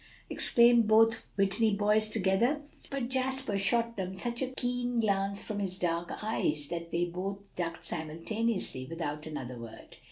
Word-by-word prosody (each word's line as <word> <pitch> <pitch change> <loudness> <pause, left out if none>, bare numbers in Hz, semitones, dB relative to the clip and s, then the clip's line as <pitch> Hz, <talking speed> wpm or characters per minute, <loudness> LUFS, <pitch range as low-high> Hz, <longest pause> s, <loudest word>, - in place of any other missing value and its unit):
_" - - -23 0.3
exclaimed 235 -1 +5
both 225 +1 +5 0.2
Whitney 200 +2 +2
boys 210 +1 +3
together. 220 +8 +2 0.3
But 270 -3 -3
Jasper 265 -3 0
shot 230 +4 +1
them 190 0 -3
such 235 +5 -2
a 265 - +1
keen 245 -1 -1
glance 200 -2 +1
from 210 -1 -4
his 190 -2 -2
dark 170 -1 -1
eyes 155 -9 0
that 170 -1 -4
they 170 +1 +1
both 185 +3 -4 0.2
ducked 170 -1 -4
simultaneously 165 - -2
without 150 -2 -4
another 130 -5 -6
word. 115 -1 -11
200 Hz, 155 wpm, -30 LUFS, 170-235 Hz, 0.3 s, exclaimed